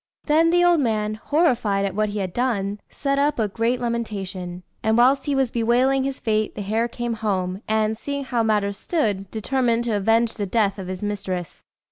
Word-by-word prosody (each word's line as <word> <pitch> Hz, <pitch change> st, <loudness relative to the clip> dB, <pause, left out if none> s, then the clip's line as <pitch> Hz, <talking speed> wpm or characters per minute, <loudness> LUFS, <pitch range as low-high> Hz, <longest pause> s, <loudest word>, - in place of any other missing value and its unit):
Then 320 Hz, +2 st, +4 dB
the 350 Hz, +1 st, +4 dB
old 350 Hz, -2 st, +5 dB
man, 215 Hz, -5 st, 0 dB
horrified 225 Hz, -, +1 dB
at 195 Hz, -, -2 dB
what 215 Hz, +1 st, 0 dB
he 205 Hz, -, -4 dB
had 185 Hz, -3 st, -3 dB
done, 210 Hz, -5 st, -1 dB
set 275 Hz, 0 st, -1 dB
up 290 Hz, +1 st, +2 dB
a 220 Hz, -3 st, +1 dB
great 230 Hz, +4 st, 0 dB
lamentation; 195 Hz, -7 st, -4 dB, 0.2 s
and 220 Hz, +1 st, +2 dB
whilst 265 Hz, +3 st, +4 dB
he 285 Hz, -, 0 dB
was 265 Hz, -3 st, +1 dB
bewailing 250 Hz, +3 st, +2 dB
his 275 Hz, -1 st, -3 dB
fate, 215 Hz, -1 st, 0 dB
the 205 Hz, -, -4 dB
hare 220 Hz, +4 st, 0 dB
came 240 Hz, 0 st, -3 dB
home, 195 Hz, -4 st, -2 dB
and, 220 Hz, 0 st, +1 dB
seeing 280 Hz, +5 st, -4 dB
how 245 Hz, -3 st, 0 dB
matters 205 Hz, -3 st, 0 dB
stood, 205 Hz, -, -1 dB
determined 235 Hz, +1 st, 0 dB
to 235 Hz, -3 st, 0 dB
avenge 225 Hz, +3 st, +2 dB
the 205 Hz, -3 st, -3 dB
death 200 Hz, -1 st, +1 dB
of 190 Hz, -, -6 dB
his 185 Hz, +2 st, -5 dB
mistress. 190 Hz, -4 st, -4 dB
220 Hz, 195 wpm, -23 LUFS, 200-250 Hz, 0.2 s, old